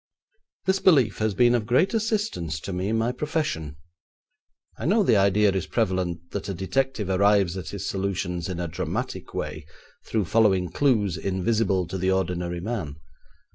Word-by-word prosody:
This 190 +1 +2
belief 135 - +4
has 110 -2 0
been 120 +3 +4
of 115 -3 0
great 130 - +3
assistance 210 - -1
to 100 - -5
me 90 +3 -2
in 115 - +1
my 115 +2 +1
profession. 125 - -3 1.0
I 115 - -2
know 210 +4 +4
the 120 - +4
idea 100 +1 +4
is 95 -2 -2
prevalent 90 -2 -1
that 100 0 -4
a 95 - -3
detective 115 +4 -1
arrives 95 -1 +3
at 90 -5 -6
his 100 +1 -5
solutions 95 -3 -2
in 90 -2 -4
a 85 - -2
dramatic 80 - -4
way - - -4 0.4
through 110 -3 0
following 95 -2 +3
clues 110 - +2
invisible 95 0 0
to 95 +3 -5
the 95 +1 +1
ordinary 90 -2 -1
man. 95 -9 -4
100 Hz, 165 wpm, -25 LUFS, 90-115 Hz, 1.0 s, belief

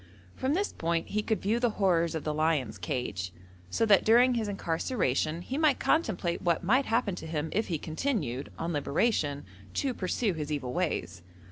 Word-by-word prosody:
From 265 +4 0
this 400 +3 -1
point 165 0 -1
he 215 - 0
could 220 0 -1
view 220 +4 +1
the 240 -1 +2
horrors 170 -4 +2
of 160 - -3
the 155 - -1
lion's 150 -9 0
cage, 90 -2 -3 0.4
so 225 - +1
that 205 -3 +5
during 245 +3 +5
his 225 -3 -1
incarceration 165 - -1
he 270 +8 -3
might 305 -4 +4
contemplate 190 - +1
what 170 0 +1
might 255 +9 +3
happen 225 -3 +1
to 175 - -7
him 155 0 -2
if 220 - 0
he 170 - -1
continued, 155 - -2
on 165 +1 -2
liberation, 145 -1 0 0.3
to 270 -2 0
pursue 200 +1 -1
his 155 -2 -4
evil 135 -4 -2
ways. 155 - -2
175 Hz, 180 wpm, -29 LUFS, 155-225 Hz, 0.4 s, that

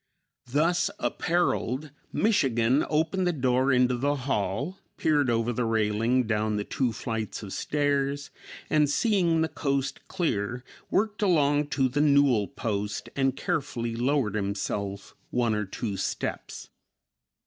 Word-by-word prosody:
Thus 170 +7 +2
appareled 155 -5 0 0.2
"Michigan" 135 - +2
opened 165 +4 +1
the - - +3
door 130 -2 +2
into 125 -1 +3
the 140 +4 0
hall, 135 - -2 0.2
peered 145 -4 +2
over 115 +1 +1
the 125 - -1
railing 115 +3 +1
down 110 -1 0
the 105 - -1
two 125 +3 -1
flights 110 -1 -4
of 95 - -7
stairs 145 -1 -1 0.4
and, 150 -2 +3
seeing 175 -3 +2
the 160 - +2
coast 140 -3 -2
clear, 120 - -2 0.3
worked 215 +1 0
along 150 -6 +3
to 135 -2 +4
the 140 +4 0
newel 140 -8 +4
post 105 0 -3
and 135 -1 +1
carefully 135 -10 -2
lowered 125 -3 +1
himself 100 -1 -3 0.2
one 120 -2 +1
or 105 0 -1
two 100 +1 -4
steps. - - -4
130 Hz, 130 wpm, -27 LUFS, 115-150 Hz, 0.4 s, to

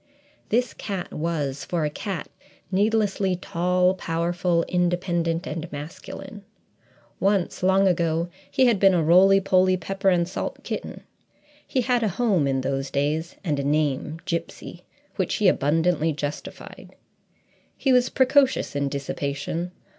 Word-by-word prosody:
This 245 +2 +1
cat 195 -4 -5
was, 150 -4 -2
for 170 -3 -1
a - - 0
cat, 190 +1 -5 0.4
needlessly 200 -1 +1
tall, 180 +1 +1
powerful, 170 0 0
independent, 175 -1 0
and 165 +2 -5
masculine. 160 +7 -8 0.8
Once, 195 -2 +1
long 190 +1 +4
ago, 170 -2 +1 0.2
he 260 - +3
had 235 -5 +3
been 195 -1 +5
a 170 - +2
roly 190 +4 +6
poly 185 -1 +3
pepper 195 +3 -1
and 175 -2 +2
salt 185 - -5
kitten; - - -5 0.7
he 260 - 0
had 245 0 +1
a 220 - +1
home 195 - +1
in 135 -1 0
those 135 +1 -2
days, 150 +4 -1
and 150 -6 -1
a - - -1
name, 150 +1 0
"Gipsy," 170 -2 -5 0.3
which - - 0
he - - +2
abundantly 160 +2 +2
justified. 145 0 -7 0.8
He 265 - +2
was 250 0 +4
precocious 265 - +2
in 140 0 0
dissipation. 140 +4 -3
175 Hz, 135 wpm, -24 LUFS, 155-195 Hz, 0.8 s, roly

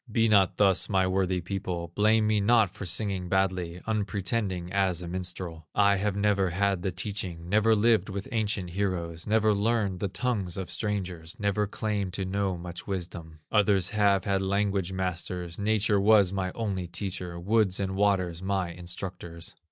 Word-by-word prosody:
Be 115 +1 +3
not 100 -4 +4
thus, 95 -3 +3
my 95 -2 +3
worthy 95 -1 0
people, 85 -2 -4
Blame 110 +2 +3
me 105 0 +2
not 110 -2 +4
for 105 -3 -6
singing 95 0 -1
badly, 90 -2 0
Unpretending 100 -3 -2
as 95 -3 +1
a - - -6
minstrel. 90 -2 -4
I 100 -1 +4
have 100 0 -1
never 100 -2 +2
had 95 +1 0
the 95 - -1
teaching, 90 -2 -4
Never 110 +4 +4
lived 110 -2 +3
with 100 0 -5
ancient 105 -6 -1
heroes, 85 -4 -2
Never 110 0 +3
learned 100 -2 0
the 100 - -1
tongues 100 -4 -2
of 95 -3 -5
strangers, 95 -6 -3
Never 105 0 0
claimed 105 -3 -2
to 95 0 -2
know 95 -1 -1
much 85 0 -8
wisdom. 85 -4 -6
Others 100 -3 +3
have 100 -3 +3
had 100 -2 +1
language 100 -1 0
masters, 90 -1 -3
Nature 105 0 +2
was 100 -2 +5
my 95 -1 -1
only 100 -6 -2
teacher, 90 -1 -4
Woods 100 +1 +2
and 95 -1 -2
waters 95 -4 +1
my 95 -2 -1
instructors. 85 -1 -7
95 Hz, 165 wpm, -28 LUFS, 90-105 Hz, -, was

